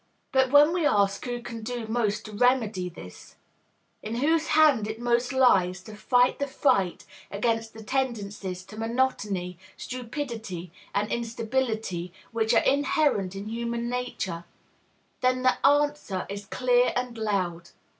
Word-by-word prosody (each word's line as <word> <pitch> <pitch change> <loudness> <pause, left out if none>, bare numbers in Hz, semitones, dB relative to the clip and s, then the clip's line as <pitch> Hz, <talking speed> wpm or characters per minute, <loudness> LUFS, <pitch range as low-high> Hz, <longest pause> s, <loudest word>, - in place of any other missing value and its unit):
But 265 -1 +3
when 290 +4 +6
we 355 -2 0
ask 200 -7 +2
who 240 -1 -4
can 230 -2 -7
do 240 +1 -4
most 220 -1 -1
to 215 - -8
remedy 215 -5 +1
this, 90 - -12 0.7
in 220 +2 -4
whose 315 +6 +2
hands 295 -9 +4
it 220 +1 -5
most 240 +1 +1
lies 190 -9 +3
to 215 +1 -10
fight 245 +4 +2
the 280 - -1
fight 250 -10 +1 0.2
against 225 +2 -1
the 220 - -9
tendencies 205 -7 -3
to 215 +3 -11
monotony, 210 -7 -1 0.2
stupidity, 230 - -5 0.2
and 205 +1 0
instability 225 -6 -2 0.2
which 225 -1 0
are - - +4
inherent 275 -8 +1
in 200 +2 -6
human 235 +1 -3
nature, 200 -9 -3 0.7
then 255 0 +1
the 255 - +2
answer 290 -8 +2
is 200 0 -6
clear 250 +2 +2
and 250 -1 -2
loud. 180 -6 -2
230 Hz, 140 wpm, -27 LUFS, 200-255 Hz, 0.7 s, when